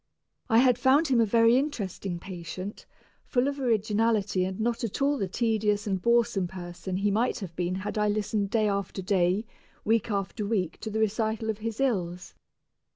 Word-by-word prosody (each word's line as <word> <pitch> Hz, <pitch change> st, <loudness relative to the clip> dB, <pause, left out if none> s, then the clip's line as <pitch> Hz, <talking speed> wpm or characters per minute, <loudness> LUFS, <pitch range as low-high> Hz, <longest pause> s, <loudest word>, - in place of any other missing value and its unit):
I 225 Hz, -, +4 dB
had 250 Hz, -1 st, +5 dB
found 280 Hz, +4 st, +4 dB
him 245 Hz, -3 st, +4 dB
a 225 Hz, -, +3 dB
very 230 Hz, +3 st, +5 dB
interesting 200 Hz, -, -3 dB
patient, 185 Hz, +2 st, -7 dB, 0.4 s
full 250 Hz, 0 st, +1 dB
of 280 Hz, 0 st, -3 dB
originality 215 Hz, -4 st, +1 dB
and 190 Hz, +2 st, -5 dB
not 235 Hz, +2 st, -1 dB
at 225 Hz, -, -3 dB
all 280 Hz, +1 st, +2 dB
the 195 Hz, -, -1 dB
tedious 210 Hz, 0 st, 0 dB
and 190 Hz, -3 st, -1 dB
boresome 235 Hz, -4 st, +2 dB
person 180 Hz, +1 st, -6 dB
he 200 Hz, +1 st, +1 dB
might 230 Hz, +5 st, +1 dB
have 180 Hz, -5 st, -7 dB
been 180 Hz, +1 st, -1 dB
had 200 Hz, +3 st, -3 dB
I 210 Hz, -, +2 dB
listened 205 Hz, -1 st, 0 dB
day 215 Hz, 0 st, +2 dB
after 200 Hz, -1 st, -2 dB
day, 190 Hz, +2 st, +1 dB, 0.4 s
week 225 Hz, 0 st, +2 dB
after 200 Hz, +1 st, -2 dB
week 200 Hz, -5 st, -1 dB
to 220 Hz, -, -5 dB
the 220 Hz, +1 st, -2 dB
recital 220 Hz, +1 st, 0 dB
of 215 Hz, -, -8 dB
his 225 Hz, +1 st, -4 dB
ills. 180 Hz, -9 st, -1 dB
210 Hz, 180 wpm, -27 LUFS, 190-230 Hz, 0.4 s, had